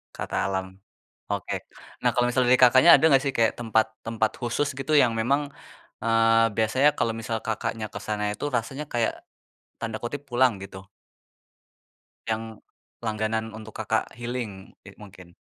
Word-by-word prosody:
kata - - -5
alam. 95 -1 -1 0.7
Oke, - - -3 0.5
nah, - - +2
kalau 120 - +2
misal 130 +1 +1
dari 125 - +6
Kakaknya 130 +7 +7
ada - - -1
nggak 135 -3 +5
sih, 135 - 0
kayak 115 -1 +4
tempat 110 -2 +2 0.2
tempat 110 -1 0
khusus 120 +4 -1
gitu 135 +3 -3
yang 120 -2 +2
memang, 140 +5 +2 0.6
eee, 115 0 +4
biasanya 130 +7 +4
kalau 115 -1 0
misal 115 0 -3
Kakaknya 110 0 -3
ke - - -5
sana 105 -1 -2
itu 105 - -9
rasanya 125 +6 -3
kayak, 115 -1 +1 0.7
tanda 110 -1 -4
kutip 140 +4 -4
"pulang", 125 0 +4
gitu? 95 0 -10 1.5
Yang 110 -1 -4 0.4
langganan 110 0 -2
untuk 110 0 -11
Kakak 110 0 -1
healing, 120 -5 -6
eee, - - -12
mungkin. 95 -4 -14
115 Hz, 150 wpm, -25 LUFS, 110-125 Hz, 1.5 s, Kakaknya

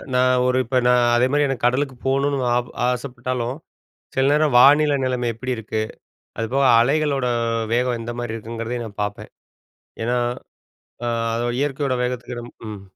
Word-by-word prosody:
நான் 125 0 +3
ஒரு 125 0 +2
இப்ப 130 +2 0
நான் 125 0 +4
அதேமாரி 130 +5 +3
எனக்கு 135 -3 -2
கடலுக்கு 130 +2 +1
போகணுன்னு, 140 +1 +1 0.2
ஆப 125 0 -2 0.2
ஆசைப்பட்டாலும், 125 0 -3 0.6
சில 130 - +2
நேரம் 150 -2 +2
வானிலை 145 +3 +6
நிலைமை 125 -1 -1
எப்டி 125 +3 -4
இருக்கு? 110 0 -3 0.6
அதுப்போக 125 +5 0 0.2
அலைகளோட 140 +1 +1 0.5
வேகம் 125 0 +1
எந்த 115 +1 -5
மாரி 120 -2 -4
இருக்குங்கிறதையும் 115 +1 -5
நான் 105 -1 -9
பாப்பேன். 105 0 -5 0.7
ஏன்னா, 120 +2 0 0.9
ஆ, - - 0 0.5
இயற்கையோட 140 -2 -1
வேகத்துக்கு 125 -1 -4 0.3
ம். 105 -2 -7
125 Hz, 135 wpm, -22 LUFS, 120-135 Hz, 0.9 s, வானிலை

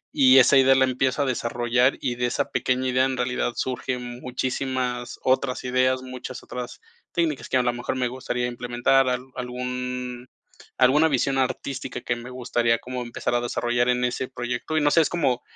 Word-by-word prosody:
y 135 -2 +7
esa 130 +2 +6
idea 135 0 +6
la 130 0 +5
empiezo 130 +2 0
a - - -1
desarrollar, 120 0 +1
y 125 - -1
de 125 0 0
esa 120 - -2
pequeña 130 +1 0
idea, 130 +1 +3
en 135 -1 -2
realidad 125 -1 -1
surgen 125 -1 -4
muchísimas 130 +1 -2 0.4
otras 130 0 +1
ideas, 130 0 +1
muchas 130 0 -8
otras 125 -1 -7 0.3
técnicas 160 -5 -1
que, - - +2
a 125 - +2
lo 120 0 +1
mejor, 120 +1 -3
me 130 -1 0
gustaría 125 -1 -3
implementar 125 +2 +1
al 125 0 -1
algún 125 0 -5 0.5
alguna 135 +5 +5
visión 135 -2 +1
artística 130 +1 -3
que 120 - -1
me 120 +1 -9
gustaría 120 -2 0
como 125 0 -5
empezar 120 0 -3
a 120 - +2
desarrollar 120 0 0
en 125 0 +2
ese 125 +1 -2
proyecto 125 +5 -3
y - - +3
no 145 0 +3
sé, 165 - +5
es 155 - +1
como 140 -8 0
125 Hz, 185 wpm, -24 LUFS, 125-130 Hz, 0.5 s, y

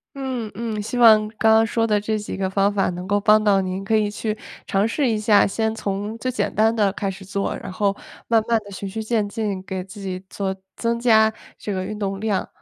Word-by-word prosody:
嗯 255 -5 -4
嗯， 220 +1 -4
希 235 +4 -3
望 215 -2 +7
刚 220 0 +5
刚 225 0 +5
说 225 0 0
的 210 -1 +2
这 215 +1 -2
几 210 - -6
个 190 - 0
方 195 +1 +2
法 200 -1 +1
能 180 +1 -6
够 205 +1 +2
帮 215 +1 +4
到 200 -2 +4
您， 185 +1 -3
可 220 +3 +1
以 210 -1 +1
去 215 0 -3 0.3
尝 195 +3 +2
试 265 +2 0
一 220 - +1
下。 210 -2 +4
先 220 +2 -1
从 205 0 -3
最 255 - -2
简 250 - -2
单 220 +1 +3
的 205 -4 +2
开 200 -1 -2
始 190 0 -8
做， 195 +1 -2
然 190 - -8
后 200 +1 0 0.3
慢 230 -1 +4
慢 230 -1 +3
地 205 - -12
循 195 +1 -6
序 220 +3 -4
渐 215 -2 0
进 205 -2 -3
给 190 -1 -4
自 195 +3 -12
己 185 -1 -5
做 190 -1 -3 0.2
增 235 0 -1
加 220 -2 +4 0.2
这 205 - -4
个 185 -1 -2
运 210 +3 -5
动 195 -2 -3
量。 215 -3 -1
210 Hz, 255 characters per minute, -22 LUFS, 195-220 Hz, 0.3 s, 望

